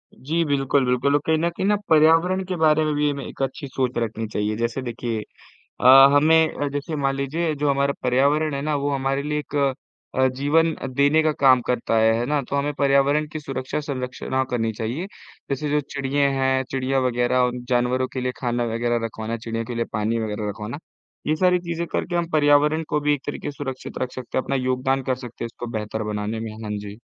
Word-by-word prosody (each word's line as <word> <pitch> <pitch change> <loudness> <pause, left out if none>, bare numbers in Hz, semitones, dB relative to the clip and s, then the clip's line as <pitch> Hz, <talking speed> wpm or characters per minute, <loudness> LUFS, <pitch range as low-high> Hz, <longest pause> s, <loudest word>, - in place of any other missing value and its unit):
जी 160 +5 -1
बिल्कुल, 140 -1 +1
बिल्कुल। 125 +3 +1
और 145 - +2
कहीं 160 0 +2
न 170 +2 +1
कहीं 180 +3 -4
ना 210 - +4
पर्यावरण 165 +4 +4
के 185 - -3
बारे 155 -1 +4
में 155 - 0
भी 150 0 +2
हमें 140 -2 -4
एक - - -9
अच्छी 135 +2 -4
सोच 130 -1 -2
रखनी 115 -1 -2
चाहिए। 105 0 -2
जैसे 115 +3 -2
देखिए 120 -2 -3 0.6
अ, - - +2 0.3
हमें 155 0 +3
जैसे 145 +3 -4
अ, - - -1
मान 135 -1 0
लीजिए 155 +4 -1
जो 145 0 0
हमारा 140 0 +1
पर्यावरण 140 +4 +2
है 140 - -2
ना 150 0 -1
वो 145 +1 -1
हमारे 135 +1 -1
लिए 150 +1 -2
एक 150 0 -6 0.6
अ, 130 0 +3
जीवन 160 +4 +2 0.2
देने 145 +3 +4
का 155 -1 +2
काम 130 -2 +6
करता 120 -2 0
है, 110 0 +4
है 120 - 0
ना। 145 0 +1
तो 140 - -4
हमें 145 +1 0
पर्यावरण 140 +2 +3
की 155 - -4
सुरक्षा 135 0 -4
संरक्षणा 130 -2 -3
करनी 115 -2 0
चाहिए। 120 - -4 0.4
जैसे 140 +2 -2
जो 150 - +2
चिड़िये 140 0 -1
हैं, 130 0 +2
चिड़िया 135 0 0
वग़ैरह 125 0 +1
और 125 -1 +2 0.2
जानवरों 125 +1 +1
के 130 - -3
लिए 125 0 -1
खाना 120 -1 0
वग़ैरह 120 0 0
रखवाना, 110 +1 -4
चिड़ियों 115 0 -4
के 120 - -6
लिए 115 0 0
पानी 105 +3 0
वग़ैरह 105 -1 -3
रखवाना। 105 +6 -5 0.5
ये 155 - +1
सारी 180 +2 +3
चीज़ें 170 -1 -3
करके 175 - -1
हम 170 -1 0
पर्यावरण 150 +1 +4
को 150 - 0
भी 150 0 +2
एक 145 - -5
तरीक़े 145 - -4
से 140 - -14
सुरक्षित 135 -2 -6
रख 125 - -3
सकते 130 -1 -4
हैं। - - +1
अपना 135 - -1
योगदान 130 +1 0
कर 130 0 0
सकते 120 0 -7
हैं - - -1
इसको 115 +1 -8
बेहतर 110 +1 -4
बनाने 105 +2 -3
में। 115 -1 -5
हाँ 105 - -5
जी। 105 +2 -9
135 Hz, 215 wpm, -23 LUFS, 120-150 Hz, 0.6 s, काम